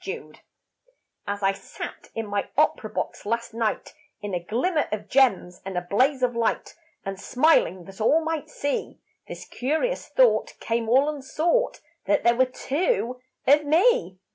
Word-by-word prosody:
TWO -, -, -6 dB, 0.9 s
As 200 Hz, 0 st, -3 dB
I 195 Hz, -, +4 dB
sat 195 Hz, -, -9 dB
in 225 Hz, -, -2 dB
my 205 Hz, -1 st, -2 dB
opera -, -, +2 dB
box -, -, -4 dB
last 230 Hz, +2 st, -2 dB
night 225 Hz, -2 st, -2 dB, 0.3 s
In 205 Hz, -2 st, -6 dB
a 180 Hz, -, 0 dB
glimmer 295 Hz, -, 0 dB
of 210 Hz, -1 st, -4 dB
gems 205 Hz, -10 st, +2 dB
and 190 Hz, -1 st, -5 dB
a -, -, +1 dB
blaze 260 Hz, +7 st, +2 dB
of 245 Hz, -1 st, +1 dB
light, 230 Hz, -1 st, -1 dB, 0.3 s
And 195 Hz, 0 st, -5 dB
smiling 245 Hz, -, +2 dB
that 195 Hz, +2 st, -11 dB
all 310 Hz, +9 st, +4 dB
might 320 Hz, -2 st, -3 dB
see, 285 Hz, -1 st, -3 dB, 0.3 s
This -, -, -8 dB
curious 315 Hz, -, -1 dB
thought -, -, +3 dB
came 230 Hz, -1 st, -1 dB
all 265 Hz, +4 st, +5 dB
unsought 305 Hz, -, 0 dB, 0.2 s
That -, -, +2 dB
there 235 Hz, 0 st, +4 dB
were 260 Hz, +2 st, +4 dB
two 260 Hz, -, -1 dB, 0.2 s
of 290 Hz, +2 st, +5 dB
me. 340 Hz, -, +3 dB
250 Hz, 160 wpm, -25 LUFS, 205-300 Hz, 0.9 s, all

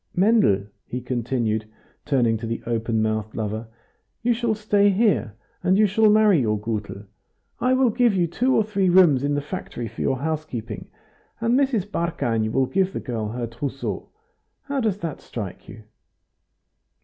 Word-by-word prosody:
Mendel," 190 Hz, -, +4 dB, 0.2 s
he 125 Hz, -, -4 dB
continued, 120 Hz, -3 st, -2 dB, 0.4 s
turning 120 Hz, -6 st, +2 dB
to 115 Hz, +1 st, -6 dB
the 115 Hz, -, -4 dB
open 115 Hz, -1 st, 0 dB
mouthed 110 Hz, -1 st, -2 dB
lover, 110 Hz, +1 st, -3 dB, 0.6 s
"you 240 Hz, 0 st, +3 dB
shall 230 Hz, -1 st, 0 dB
stay 205 Hz, -1 st, +3 dB
here, 195 Hz, -, +1 dB, 0.3 s
and 185 Hz, +1 st, +3 dB
you 215 Hz, -, +5 dB
shall 215 Hz, +2 st, +4 dB
marry 210 Hz, -6 st, +5 dB
your 105 Hz, -3 st, +1 dB
Gutel. 105 Hz, -2 st, -4 dB, 0.6 s
I 255 Hz, +1 st, +2 dB
will 255 Hz, -2 st, +3 dB
give 240 Hz, -2 st, +3 dB
you 175 Hz, -2 st, +3 dB
two 245 Hz, +10 st, +1 dB
or 220 Hz, -, +4 dB
three 200 Hz, -3 st, +1 dB
rooms 170 Hz, -7 st, +5 dB
in 145 Hz, 0 st, +1 dB
the 145 Hz, -, 0 dB
factory 145 Hz, -6 st, -6 dB
for -, -, -8 dB
your 135 Hz, -, +1 dB
housekeeping, 140 Hz, -7 st, -4 dB, 0.5 s
and 230 Hz, +1 st, +1 dB
Mrs. 260 Hz, -7 st, +2 dB
Barkany 140 Hz, -, -1 dB
will 135 Hz, +2 st, +2 dB
give 190 Hz, +6 st, 0 dB
the -, -, -3 dB
girl 115 Hz, -4 st, -3 dB
her 120 Hz, +2 st, -3 dB
trousseau. 130 Hz, +4 st, -5 dB, 0.5 s
How 280 Hz, -1 st, -2 dB
does 215 Hz, -6 st, 0 dB
that 165 Hz, -4 st, -4 dB
strike 105 Hz, -6 st, -7 dB
you?" 110 Hz, +2 st, -11 dB
145 Hz, 165 wpm, -23 LUFS, -, 0.6 s, you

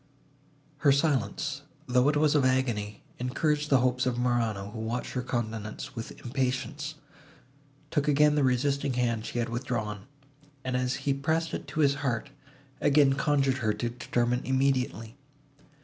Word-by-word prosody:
Her 145 Hz, 0 st, +4 dB
silence, 140 Hz, -2 st, 0 dB, 0.2 s
though 125 Hz, +2 st, +3 dB
it 150 Hz, -, +1 dB
was 150 Hz, -1 st, +3 dB
that 150 Hz, -, +4 dB
of 135 Hz, -, +2 dB
agony, 120 Hz, -6 st, 0 dB, 0.2 s
encouraged 150 Hz, +4 st, 0 dB
the 135 Hz, -3 st, +5 dB
hopes 125 Hz, 0 st, +1 dB
of 125 Hz, -1 st, 0 dB
Morano, 115 Hz, -5 st, 0 dB
who 110 Hz, -, -7 dB
watched 115 Hz, +3 st, -3 dB
her 125 Hz, -, -2 dB
countenance 115 Hz, +1 st, -4 dB
with 115 Hz, -1 st, -7 dB
impatience, 135 Hz, +4 st, -2 dB, 1.0 s
took 145 Hz, 0 st, 0 dB
again 150 Hz, 0 st, +5 dB
the 150 Hz, -1 st, +2 dB
resisting 135 Hz, +2 st, +1 dB
hand 115 Hz, -3 st, 0 dB
she -, -, -5 dB
had 120 Hz, -1 st, 0 dB
withdrawn, 115 Hz, -4 st, -3 dB, 0.6 s
and, 130 Hz, -1 st, -2 dB
as 125 Hz, 0 st, 0 dB
he 140 Hz, -, +3 dB
pressed 160 Hz, +4 st, -1 dB
it -, -, -4 dB
to 150 Hz, +3 st, -1 dB
his 140 Hz, -2 st, +5 dB
heart, 120 Hz, -5 st, -2 dB, 0.5 s
again 145 Hz, -1 st, +5 dB
conjured 135 Hz, -2 st, +2 dB
her 110 Hz, -4 st, +1 dB
to 120 Hz, -, -2 dB
determine 120 Hz, 0 st, -1 dB
immediately. 130 Hz, -4 st, 0 dB
130 Hz, 155 wpm, -28 LUFS, 120-140 Hz, 1.0 s, the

